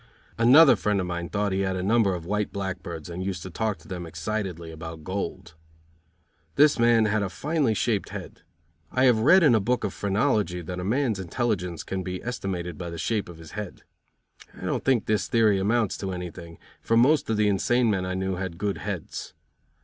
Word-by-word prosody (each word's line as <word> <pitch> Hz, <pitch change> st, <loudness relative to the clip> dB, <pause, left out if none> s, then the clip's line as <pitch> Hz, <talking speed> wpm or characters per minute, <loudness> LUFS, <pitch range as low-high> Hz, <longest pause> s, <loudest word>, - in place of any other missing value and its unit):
Another 135 Hz, +6 st, +8 dB
friend 105 Hz, -1 st, 0 dB
of 90 Hz, -, -1 dB
mine 85 Hz, -1 st, -4 dB
thought 105 Hz, -1 st, -1 dB
he 95 Hz, -, 0 dB
had 95 Hz, -1 st, 0 dB
a 90 Hz, -, -3 dB
number 100 Hz, -2 st, +3 dB
of 85 Hz, -2 st, -7 dB
white 105 Hz, +2 st, -1 dB
blackbirds 90 Hz, -5 st, -5 dB
and 90 Hz, +1 st, -5 dB
used 95 Hz, -3 st, -4 dB
to 95 Hz, -, -8 dB
talk 110 Hz, +1 st, -1 dB
to 80 Hz, -, -19 dB
them 90 Hz, -3 st, -6 dB
excitedly 85 Hz, 0 st, -4 dB
about 80 Hz, 0 st, -8 dB
gold. 95 Hz, 0 st, -5 dB, 1.0 s
This 145 Hz, -3 st, +5 dB
man 115 Hz, -1 st, +5 dB
had 105 Hz, 0 st, +1 dB
a 100 Hz, -, -1 dB
finely 145 Hz, -, 0 dB
shaped 105 Hz, 0 st, 0 dB
head. -, -, -8 dB, 0.5 s
I 130 Hz, -, +1 dB
have 120 Hz, -4 st, +5 dB
read 170 Hz, +11 st, +6 dB
in 145 Hz, -6 st, +6 dB
a 110 Hz, -, +4 dB
book 120 Hz, +5 st, 0 dB
of 95 Hz, -, -2 dB
phrenology 100 Hz, -3 st, 0 dB
that 90 Hz, +2 st, -6 dB
a -, -, -4 dB
man's 115 Hz, 0 st, 0 dB
intelligence 90 Hz, -3 st, -2 dB
can 95 Hz, -1 st, -3 dB
be 90 Hz, 0 st, -4 dB
estimated 95 Hz, -7 st, -4 dB
by 85 Hz, -1 st, -5 dB
the 85 Hz, -, -7 dB
shape 105 Hz, +2 st, -1 dB
of 85 Hz, -, -10 dB
his 80 Hz, 0 st, -12 dB
head. 105 Hz, -3 st, -7 dB, 0.8 s
I -, -, -7 dB
don't -, -, -1 dB
think 130 Hz, -5 st, +2 dB
this 105 Hz, -1 st, 0 dB
theory 110 Hz, -4 st, +3 dB
amounts 110 Hz, +2 st, +1 dB
to 95 Hz, -1 st, -3 dB
anything, 85 Hz, -2 st, -7 dB, 0.2 s
for 115 Hz, -, +2 dB
most 140 Hz, +4 st, +4 dB
of 110 Hz, -, +1 dB
the 105 Hz, 0 st, +3 dB
insane 115 Hz, +4 st, +2 dB
men 95 Hz, -3 st, 0 dB
I 90 Hz, 0 st, -3 dB
knew 95 Hz, 0 st, -2 dB
had 90 Hz, -3 st, -4 dB
good 100 Hz, +1 st, -2 dB
heads. 100 Hz, -5 st, -6 dB
100 Hz, 205 wpm, -26 LUFS, 90-115 Hz, 1.0 s, Another